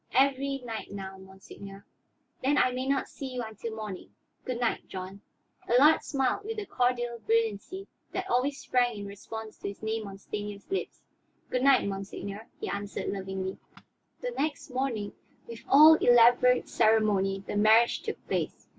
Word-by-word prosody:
"Every 275 +1 +2
night 225 -2 -6
now, 190 -1 -7
monseigneur." 195 +1 -12 0.6
"Then 280 +2 +2
I 255 - +4
may 255 +1 -3
not 275 -1 +1
see 265 -2 -7
you 245 - -2
until 220 0 -6
morning. 210 -4 -7 0.3
Good 250 -2 -3
night, 240 -2 -1
John." 190 +1 -7 0.5
Allard 280 +7 +6
smiled 270 +6 -1
with 450 +2 -5
the 420 - -3
cordial 240 -4 0
brilliancy 225 - -1 0.3
that 375 0 -3
always 275 -1 +1
sprang 245 -3 +1
in 200 - -6
response 215 +2 -8
to - - -5
his 200 +2 -8
name 220 -1 -2
on 195 -1 -9
Stanief's 205 - -7
lips. 390 - -3 0.5
"Good 250 - 0
night, 270 -5 +5
monseigneur," 200 +2 -6
he - - -4
answered 205 0 -4
lovingly. 190 -1 -4 0.6
The - - -3
next 300 - -3
morning, 250 -6 -2 0.3
with 230 -1 -9
all 305 +3 +9
elaborate 245 -2 +5
ceremony, 210 -3 +2
the - - -5
marriage 220 +3 +4
took - - -6
place. - - -3
230 Hz, 155 wpm, -29 LUFS, 200-260 Hz, 0.6 s, all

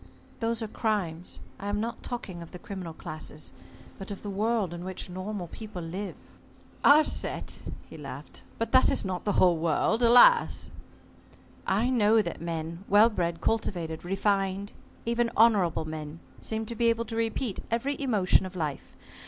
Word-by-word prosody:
"Those 230 -1 -1
are - - -3
crimes. 185 -7 -2 0.2
I 200 - -5
am 205 0 0
not 230 +2 -3
talking 190 -8 -5
of 170 - -9
the - - -9
criminal 180 -3 -7
classes, 155 -1 -6 0.5
but 195 - -7
of 200 - -7
the 205 - -4
world 210 -2 0
in 175 0 -6
which 185 0 -5
normal 185 +1 -4
people 215 -2 -8
live." 185 +5 -5 0.7
"Our 295 +2 +8
set," - - -4 0.3
he - - -11
laughed, - - -8 0.2
"but 230 - -2
that 260 - +6
is - - +1
not 185 -1 -3
the 205 - +1
whole 180 -2 +5
world, 170 +8 +1
alas!" 245 - +6 1.0
"I 215 +7 +2
know 225 -2 +4
that 170 - -5
men 165 +1 -4
well 210 +3 +6
bred, 170 -4 -1
cultivated, 175 -8 -1
refined, 195 +1 0 0.3
even 235 0 +1
honorable 200 -8 +4
men, 155 0 -6 0.2
seem 220 0 -3
to 235 - -6
be 235 +1 +2
able 230 0 +2
to 225 - -5
repeat 225 0 -1
every 250 +5 0
emotion 205 -8 +3
of 185 - -12
life. 155 -5 -4
200 Hz, 165 wpm, -28 LUFS, 175-230 Hz, 1.0 s, Our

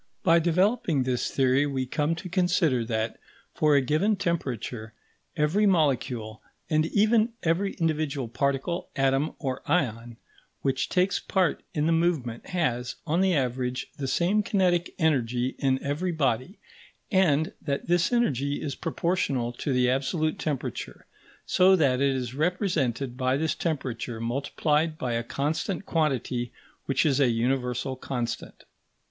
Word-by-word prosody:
By 165 +1 +5
developing 175 - +2
this 125 -1 -1
theory, 135 +2 +2
we 135 -2 -2
come 150 +5 0
to 185 +3 -7
consider 175 -8 +2
that, 110 0 -2 0.3
for 150 -1 +3
a 140 - +5
given 155 - +2
temperature, 130 - -3 0.4
every 165 +8 +3
molecule 130 - 0 0.3
(and 155 +1 +3
even 215 +4 +3
every 175 +4 +1
individual 155 -5 -1
particle, 140 +7 -1
atom, 135 +2 +1
or 130 -3 -3
ion) 120 -7 0 0.5
which 135 -1 0
takes 185 +1 +2
part 185 -5 0
in 150 -1 +1
the 165 - +2
movement 160 -9 0
has, 125 -9 -1
on 165 +3 +1
the 190 -2 +3
average, 125 -2 -2
the 140 - -3
same 175 +10 +2
kinetic 180 -4 +1
energy 125 -6 +1
in 130 -1 +2
every 150 +6 -1
body, 135 - -1 0.5
and 160 -6 +3
that 140 -2 -2
this 175 +3 +2
energy 145 - +1
is 145 -3 -3
proportional 145 -8 -1
to 140 - -3
the 125 -1 +3
absolute 155 +5 0
temperature; 145 -5 -4 0.4
so 190 +1 +5
that 135 -6 +2
it 140 -1 +2
is 125 -2 -3
represented 150 - 0
by 130 0 +1
this 160 +2 0
temperature 125 -7 -3
multiplied 150 +6 0
by 125 -4 -2
a 115 - 0
constant 155 +10 -2
quantity 130 -6 -1 0.3
which 135 - +1
is 140 -3 +2
a 135 -3 +4
universal 125 +2 -1
constant. 125 -2 -5
145 Hz, 140 wpm, -27 LUFS, 125-170 Hz, 0.5 s, By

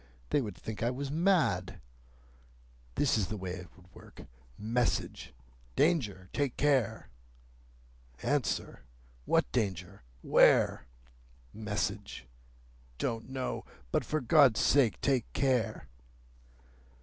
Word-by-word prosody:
They 145 - +3
would 105 -7 -6
think 110 -2 -7
I 115 - +2
was 135 +2 -4
mad. 155 - +1 1.2
This 130 -6 +2
is 95 - 0
the 105 - -4
way 95 -2 -5
it 90 0 -7
would 90 - -18
work,—Message: 105 - -4 0.4
'Danger! 110 - +1
Take 140 -4 -1
care!' 140 -7 +1 1.1
Answer: - - -1 0.4
'What - - +2
Danger? 95 - -2 0.2
Where?' - - +4 0.7
Message: 105 - -4 0.7
'Don't 115 - -3
know. 130 -1 -3 0.3
But, - - +1
for 155 - -2
God's 130 -2 +5
sake, 125 -10 +3
take 130 -4 0
care! 115 - 0
110 Hz, 100 wpm, -31 LUFS, 95-135 Hz, 1.2 s, God's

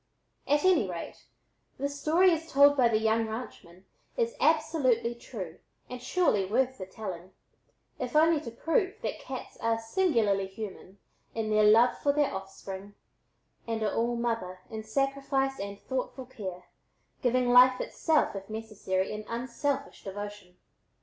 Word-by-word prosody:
At 290 +1 +3
any 335 - +4
rate, 170 -2 -7 0.5
the 280 - -1
story 315 +6 +3
as 330 -1 -2
told 285 +1 +7
by 255 -4 +5
the 225 -2 +2
young 220 +1 +1
ranchman 195 -5 -8 0.3
is 470 -1 +1
absolutely 285 -7 +2
true 195 -8 -8 0.3
and 250 -1 -6
surely 250 - +2
worth 250 +6 0
the 185 - -6
telling, 185 -3 -7 0.7
if 250 +2 -4
only 315 0 +5
to 270 - -6
prove 370 - 0
that - - -3
cats - - -8
are 230 0 +1
singularly 225 - +1
human 195 -1 -8 0.4
in 220 -1 -2
their 215 0 +4
love 225 +4 +5
for 285 - +2
their 290 -3 +1
offspring, 195 +1 -8 0.7
and 225 -1 -2
are 210 - 0
all 235 +1 0
mother 225 -6 -2
in 220 -1 -4
sacrifice 275 +3 0
and 200 0 -5
thoughtful 260 0 -4
care, 190 -8 -7 0.6
giving 245 0 +2
life 255 +1 +7
itself 315 -9 +1
if 195 +1 -7
necessary 215 -4 -2
in 215 0 -5
unselfish 260 +4 -3
devotion. 205 -2 -7
230 Hz, 145 wpm, -29 LUFS, 205-275 Hz, 0.7 s, told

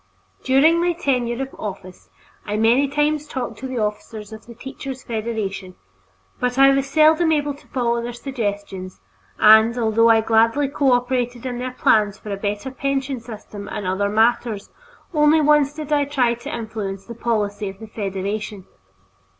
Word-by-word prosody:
During 310 +6 +4
my 350 0 +2
tenure 250 -6 -1
of 270 - -9
office 190 -3 -8 0.3
I 210 0 -3
many 235 +6 +3
times 295 +1 0
talked 245 -6 -5
to 265 - -5
the 260 -1 -5
officers 210 0 -4
of 220 +1 -12
the 235 - -11
Teachers' 265 +1 -8
Federation, 215 -5 -4 0.6
but 250 0 -1
I 275 0 +7
was 275 0 +1
seldom 315 +2 +4
able 290 -2 +1
to 285 - -18
follow 235 -2 0
their 240 +1 -4
suggestions 205 -7 -5 0.4
and, 220 +2 +6
although 230 0 +3
I 225 -1 +5
gladly 230 +5 +2
cooperated 245 -3 0
in 245 -1 -3
their 255 +1 -3
plans 210 -4 +2
for 210 - -8
a - - -1
better 205 +5 -3
pension 270 -1 -2
system 215 -3 -9
and 210 -2 -5
other 190 +2 0
matters, 220 -1 +1 0.4
only 300 0 +4
once 295 -2 +4
did 305 -1 -4
I 290 -1 +3
try 260 -4 +1
to 235 +1 -8
influence 210 -4 -5
the 235 - -8
policy 210 -3 -2
of 190 - -10
the 220 - -8
Federation. 200 -1 -4
235 Hz, 165 wpm, -21 LUFS, 210-270 Hz, 0.6 s, I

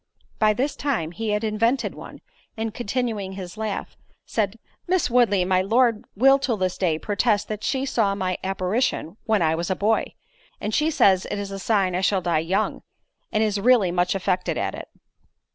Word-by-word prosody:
By 215 -1 +4
this 265 +6 -1
time 235 - -1
he 220 +4 -4
had 210 +1 0
invented 230 +4 0
one, - - -11 0.4
and, 225 -1 -3
continuing 225 -4 -2
his 185 -1 -7
laugh, 215 -2 -4 0.3
said, 215 -1 -1 0.3
"Miss 360 -7 +1
Woodley, 215 -7 +3
my 185 0 +2
Lord, 230 +2 +2
will 270 +6 +5
to 245 -5 -1
this 185 -1 -1
day 170 -5 0
protest 205 +3 0
that 215 -1 -5
she 270 0 0
saw 215 -7 +1
my 185 -2 -2
apparition 190 0 -1
when 220 -5 +2
I 160 0 +2
was 170 +2 -2
a 190 - +1
boy; 215 +4 0 0.4
and 210 - -3
she 305 +6 +2
says 190 - +3
it - - -3
is 200 -1 -5
a 195 - -5
sign 195 -2 +1
I 180 - 0
shall 190 0 +2
die 170 -2 +1
young, 170 +5 -1 0.5
and 215 - +2
is 210 -2 0
really 220 -4 +4
much 180 +1 +1
affected 185 -1 -1
at - - -1
it." - - -8
205 Hz, 190 wpm, -24 LUFS, 185-230 Hz, 0.5 s, will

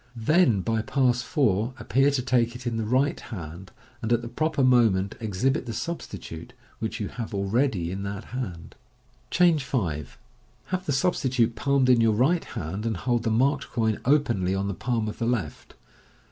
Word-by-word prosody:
Then 120 - +3
by 115 +2 0
Pass 125 0 +1
4 120 - 0
appear 135 +1 +2
to 140 -3 -1
take 120 -2 +1
it 125 +1 -9
in 120 -2 -1
the 110 - -1
right 130 +5 +2
hand, 90 -3 -8 0.3
and 110 - -2
at 120 0 +2
the - - -5
proper 155 +2 0
moment 110 -6 +3
exhibit 115 +5 -1
the 115 - -3
substitute, 125 - -6 0.3
which 110 +2 -3
you 105 - -2
have 115 -2 -6
already 100 -3 0
in 95 +1 -4
that 100 0 -5
hand. 95 -10 -5 0.6
Changb 175 -2 +4
5.— 90 - -2 0.6
Have 185 0 -3
the - - +1
substitute 130 -5 +1
palmed 140 +3 +2
in 125 -2 +5
your 115 -1 +4
right 145 +11 +2
hand, 90 +7 -5
and 110 -4 -1
hold 120 +3 0
the 115 - -1
marked 135 +5 +1
coin 110 -2 0
openly 120 -10 +2
on 100 +1 -1
the 100 - -2
palm 115 +2 -1
of 105 - -6
the 115 - 0
left. 110 -11 -3
120 Hz, 180 wpm, -26 LUFS, 100-130 Hz, 0.6 s, in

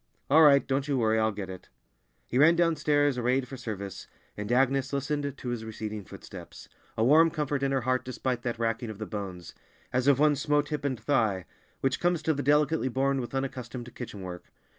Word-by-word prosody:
"All 155 +3 +7
right! 140 -3 +6
Don't 135 +1 -1
you 140 -2 +1
worry, 110 -2 +2
I'll 110 0 +2
get 100 -2 -6
it." 95 -1 -10 0.6
He 125 - -1
ran 165 +4 +6
downstairs, 150 -5 +2
arrayed 125 +2 +1
for 135 - -8
service, 105 -6 -6 0.3
and 105 +2 -5
Agnes 135 +1 +2
listened 140 0 -2
to 125 - -6
his 120 -2 -3
receding 110 -2 -6
footsteps, - - -11 0.3
a 110 - +2
warm 155 +7 +6
comfort 145 -3 -2
in 135 0 +1
her 135 -1 +1
heart 130 +1 0
despite 130 -1 -3
that 120 -1 -3
racking 115 0 -1
of 110 - -7
the 110 - -5
bones, 95 -5 -6 0.4
as 130 +1 +1
of 140 -2 +6
one 150 +1 +4
"smote 145 +1 +1
hip 150 -1 -3
and 130 -4 -1
thigh," 110 - +1 0.4
which 135 -1 0
comes 175 -2 +1
to 160 - +2
the 145 - -3
delicately 150 0 +2
born 135 +1 +1
with 120 +2 -6
unaccustomed 125 -3 -5
kitchen 105 -5 -7
work. 90 -1 -8
130 Hz, 205 wpm, -28 LUFS, 115-145 Hz, 0.6 s, All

